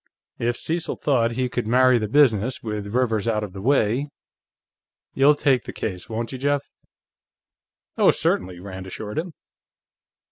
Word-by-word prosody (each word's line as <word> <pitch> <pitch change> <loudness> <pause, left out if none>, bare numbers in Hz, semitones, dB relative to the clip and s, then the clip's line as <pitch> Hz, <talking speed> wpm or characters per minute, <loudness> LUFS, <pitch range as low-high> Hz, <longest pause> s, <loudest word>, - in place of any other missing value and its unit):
If 120 +1 0
Cecil 165 0 -2
thought 120 -5 +1
he 130 +1 0
could 120 -2 -3
marry 125 +1 +4
the 110 - -2
business, 125 -2 +2
with 105 -2 -4
Rivers 115 -3 0
out 105 -2 0
of 100 -3 -7
the 95 - -7
way.... 130 +2 +2 1.1
You'll 140 +2 +5
take 135 -4 +2
the - - -6
case, 90 0 -5
won't 115 +1 -3
you, 130 - -6
Jeff?" 145 +1 +1 1.4
"Oh, - - +6
certainly," 90 -1 0
Rand 95 0 -8
assured 105 +6 -5
him. 170 +1 -5
115 Hz, 150 wpm, -23 LUFS, 105-135 Hz, 1.4 s, Oh